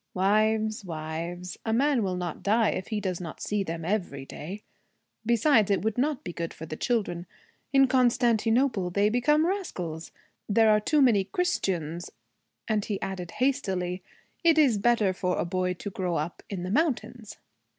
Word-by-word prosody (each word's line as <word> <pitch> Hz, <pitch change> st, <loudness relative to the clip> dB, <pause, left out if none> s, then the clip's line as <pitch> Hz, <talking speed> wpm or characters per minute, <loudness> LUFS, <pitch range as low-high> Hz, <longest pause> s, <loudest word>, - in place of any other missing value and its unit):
'Wives, 215 Hz, +3 st, +2 dB
wives 170 Hz, +2 st, -5 dB
a 225 Hz, -, -1 dB
man 265 Hz, +2 st, +2 dB
will 190 Hz, -3 st, -1 dB
not 175 Hz, -3 st, -4 dB
die 220 Hz, +2 st, +3 dB
if 185 Hz, -, -4 dB
he 215 Hz, -2 st, -2 dB
does 185 Hz, -3 st, -3 dB
not 165 Hz, -3 st, -7 dB
see 210 Hz, -1 st, -1 dB
them 165 Hz, -2 st, -5 dB
every 175 Hz, -8 st, -2 dB
day! 185 Hz, +10 st, -8 dB, 0.6 s
Besides, 235 Hz, -2 st, +4 dB
it 200 Hz, -1 st, +1 dB
would 220 Hz, -1 st, 0 dB
not 280 Hz, +2 st, 0 dB
be 175 Hz, -, -6 dB
good 165 Hz, 0 st, -5 dB
for 160 Hz, -, -8 dB
the 155 Hz, -, -6 dB
children. 180 Hz, -5 st, -1 dB, 0.4 s
In 270 Hz, -1 st, +6 dB
Constantinople 240 Hz, -4 st, +2 dB
they 200 Hz, +3 st, +2 dB
become 295 Hz, +7 st, +3 dB
rascals. 180 Hz, -, -3 dB, 0.4 s
There 220 Hz, +1 st, +5 dB
are 210 Hz, -, +5 dB
too 290 Hz, +7 st, +3 dB
many 210 Hz, -7 st, +4 dB
Christians.' 175 Hz, -, -2 dB, 0.6 s
And 215 Hz, -2 st, +1 dB
he 205 Hz, -2 st, -3 dB
added 185 Hz, -3 st, -5 dB
hastily, 190 Hz, -9 st, 0 dB, 0.4 s
'It 330 Hz, -2 st, +5 dB
is 265 Hz, -9 st, +4 dB
better 215 Hz, -3 st, +3 dB
for 180 Hz, -1 st, -1 dB
a -, -, 0 dB
boy 180 Hz, +1 st, -1 dB
to 200 Hz, +3 st, -6 dB
grow 180 Hz, -2 st, -2 dB
up 155 Hz, +3 st, -3 dB
in 190 Hz, -3 st, -4 dB
the 185 Hz, -, -3 dB
mountains.' 245 Hz, -5 st, -1 dB
205 Hz, 170 wpm, -27 LUFS, 180-240 Hz, 0.6 s, In